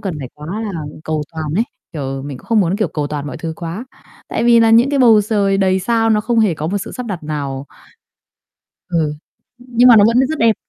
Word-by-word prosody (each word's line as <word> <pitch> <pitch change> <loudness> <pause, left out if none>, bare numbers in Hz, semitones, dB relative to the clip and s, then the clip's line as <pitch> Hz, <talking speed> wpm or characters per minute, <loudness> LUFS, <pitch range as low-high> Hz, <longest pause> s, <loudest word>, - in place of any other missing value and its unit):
cần 195 -6 -4
phải 130 - -6
quá 150 0 -10 0.2
là 210 - -3 0.3
cầu 155 -1 -2
toàn 160 -1 -5
ấy, 225 +6 +2 0.3
kiểu, 135 -3 -4
mình 140 -2 -7
cũng - - -17
không 225 -2 +3
muốn, 185 +2 +1
kiểu, 215 - 0
cầu 150 -2 -3
toàn 145 -1 -5
mọi 140 - -6
thứ 165 -1 -5
quá 175 +8 -6 0.4
tại - - -2
vì 235 -1 +6
nà 225 0 +4
những 235 +4 +5
cái 285 - +1
bầu 225 -4 +6
trời 200 -2 +1
đầy 190 -1 +2
sao 225 +2 +1
nó 210 -1 +3
không 230 +1 0
hề 205 -6 +2
có 155 +1 -4
một 200 +4 -1
sự - - -7
sắp 250 -1 -6
đặt 185 -6 -5
nào. 140 -2 -4 1.2
Ừ, 160 -4 0 0.4
nhưng 245 0 +2
mà 235 - +9
nó 205 - +7
vẫn 235 +2 +3
rất 315 - -3
đẹp, 225 -1 +4
195 Hz, 240 wpm, -17 LUFS, 155-230 Hz, 1.2 s, mà